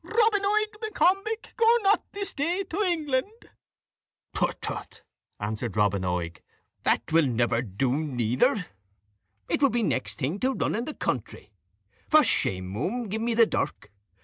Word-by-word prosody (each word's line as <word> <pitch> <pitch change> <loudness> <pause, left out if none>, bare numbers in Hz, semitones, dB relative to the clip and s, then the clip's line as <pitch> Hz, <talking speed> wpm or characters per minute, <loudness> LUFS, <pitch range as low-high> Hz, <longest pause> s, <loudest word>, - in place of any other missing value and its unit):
Robin 435 -2 +2
Oig 425 +2 +2
M'Combich, 435 +1 0
go 465 0 +5
not 400 +2 +4
this 400 -1 -3
day 340 +7 -1
to 375 +2 -3
England!" 345 - -1 0.8
"Prutt, - - 0
trutt," - - -6 0.4
answered 110 +1 -4
Robin 100 -2 +2
Oig, 90 -2 -3 0.4
"that - - +1
will 160 -2 +4
never 120 -1 +1
do 125 +4 -1
neither; 130 - +1 0.8
it - - 0
would 275 -4 +4
be 240 -1 +1
next - - -1
thing 155 +8 -2
to 260 +3 0
running 230 +3 -1
the 305 - -5
country. - - -4 0.6
For 310 -1 +7
shame, 95 - +2
muhme, 200 - -2
give 220 +3 -2
me 230 0 0
the 230 0 +6
dirk. - - -3
230 Hz, 150 wpm, -26 LUFS, -, 0.8 s, For